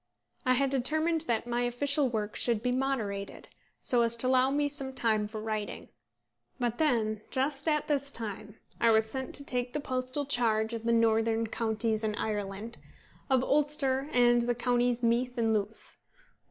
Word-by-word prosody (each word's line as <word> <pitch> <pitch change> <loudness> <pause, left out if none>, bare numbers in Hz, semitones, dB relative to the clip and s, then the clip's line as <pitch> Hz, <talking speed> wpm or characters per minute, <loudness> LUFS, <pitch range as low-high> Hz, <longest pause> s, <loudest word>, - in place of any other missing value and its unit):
I 255 - +5
had 270 +1 +1
determined 310 +5 +1
that 230 -1 0
my 240 0 -1
official 270 +3 +2
work 215 -2 -3
should 230 -3 0
be 250 - +1
moderated, 235 -7 -3 0.3
so 245 -2 +3
as 230 0 +3
to 235 +2 0
allow 255 0 +4
me 290 +1 +1
some 275 -2 -3
time 215 -4 +1
for 215 +1 -7
writing; 215 -1 -4 0.7
but 240 -1 -1
then, 225 -8 +1
just 275 +3 -1
at 300 -2 +1
this 280 -2 0
time, 215 -3 -7 0.2
I 230 - +4
was 220 0 +4
sent 265 +3 -4
to 280 - -1
take 245 -2 -2
the 300 - -1
postal 255 +1 -3
charge 230 -4 +1
of 230 0 -5
the 235 - +2
northern 225 0 +2
counties 220 0 -1
in 215 -1 -1
Ireland, 210 +1 -4 0.5
of 260 -1 +3
Ulster, 280 -1 +1
and 240 -2 +4
the 240 0 0
counties 245 0 +1
Meath 245 +2 +1
and 225 -1 +2
Louth. 210 +1 -4
240 Hz, 170 wpm, -29 LUFS, 220-265 Hz, 0.7 s, I